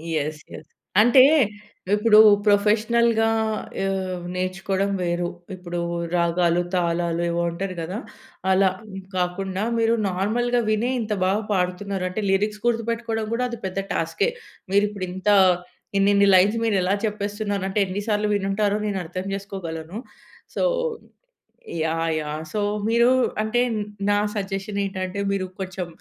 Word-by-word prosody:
Yes. 155 0 -2
Yes. 150 0 -12 0.3
అంటే 245 +3 +7 0.7
ఇప్పుడు 215 0 +5 0.3
ప్రొఫెషనల్‌గా 225 +2 +3 0.6
ఆహ్, 185 -2 -2
నేర్చుకోవడం 190 +2 -1
వేరు. 175 0 -1 0.3
ఇప్పుడు 175 -1 -5 0.4
రాగాలు, 170 0 +2
తాళాలు 170 -1 0
ఏవో 170 0 0
అంటారు 185 +2 -4
గదా! 180 +7 -4 0.5
అలా 190 0 +4 0.5
కాకుండా 185 +2 -2
మీరు 230 0 +3 0.2
నార్మల్‌గా 240 +6 0
వినే 215 +3 +1
ఇంత 215 -1 -2
బాగా 200 +4 +1
పాడుతున్నారంటే 185 +1 -2
లిరిక్స్ 210 +2 0
గుర్తుపెట్టుకోవడం 230 -1 -1
గూడా 250 +2 0
అది 235 - -6
పెద్ద 190 +1 -3
టాస్కె. 285 - 0 0.4
మీరు 200 +1 +4
ఇప్పుడు 200 -3 -5
ఇంత 190 +3 -2 0.7
ఇన్నిన్ని 200 0 +4
లైన్స్ 195 +4 +5
మీరు 220 -3 +1
ఎలా 185 +2 +1
చెప్పేస్తున్నారంటే 205 -1 -2
ఎన్ని 190 +2 -4
సార్లు 210 0 +1
వినుంటారో 200 +1 0
నేను 200 - -2
అర్థం 185 +3 -5
చేసుకోగలను. 185 -3 -6 0.6
So - - 0 1.2
yeah! 165 0 0
యాహ్! 150 +1 -5
సో 215 - -1 0.3
మీరు 235 +2 +4 0.3
అంటే 230 +3 +1 0.5
నా 205 - +3 0.2
సజెషనేంటంటే 195 -1 -3
మీరు 195 -1 -1 0.2
కొంచెం 185 -1 -4
195 Hz, 120 wpm, -23 LUFS, 180-210 Hz, 1.2 s, అంటే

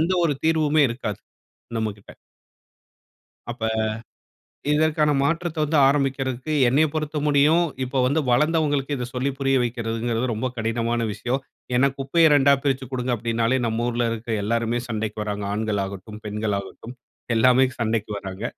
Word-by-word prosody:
எந்த 170 +4 +1
ஒரு 150 - +2
தீர்வுமே 155 -1 +3
இருக்காது 115 -4 -4 0.6
நம்மகிட்ட. 105 -2 -4 1.4
அப்ப. 120 -1 -8 1.1
இதற்கான 150 0 +2
மாற்றத்தை 165 +3 -1
வந்து 150 +1 +1
ஆரம்பிக்கிறதுக்கு 135 0 0
என்னைய 140 +6 +4
பொறுத்த 155 -1 -2
முடியும், 150 +4 +4 0.2
இப்ப 130 +1 -1
வந்து 140 +5 +2
வளந்தவங்களுக்கு 145 +1 +1
இத 125 - -3
சொல்லி 130 +2 -1
புரிய 135 0 +2
வைக்கிறதுங்கிறது 115 0 -2
ரொம்ப 115 +3 -2
கடினமான 115 +1 -1
விஷயம். 125 +5 -2 0.4
ஏன்னா, 135 +3 +4
குப்பைய 155 +4 +3
2 140 -1 +5
பிரிச்சு 135 -2 0
கொடுங்க 125 -1 -2
அப்படின்னாலே, 115 +2 0
நம்ம 115 +1 -1
ஊர்ல 120 0 0
இருக்கிற 115 0 -4
எல்லோருமே 115 +2 0
சண்டைக்கு 110 -2 -3
வராங்க. 105 -1 -4
ஆண்கள் 105 -1 -1
ஆகட்டும், 100 +2 -7
பெண்கள் 105 0 -2
ஆகட்டும் 115 +5 -10 0.4
எல்லாமே 125 +3 +5 0.2
சண்டைக்கு 110 -2 -1
வராங்க. 95 +1 -7
125 Hz, 135 wpm, -23 LUFS, 115-145 Hz, 1.4 s, 2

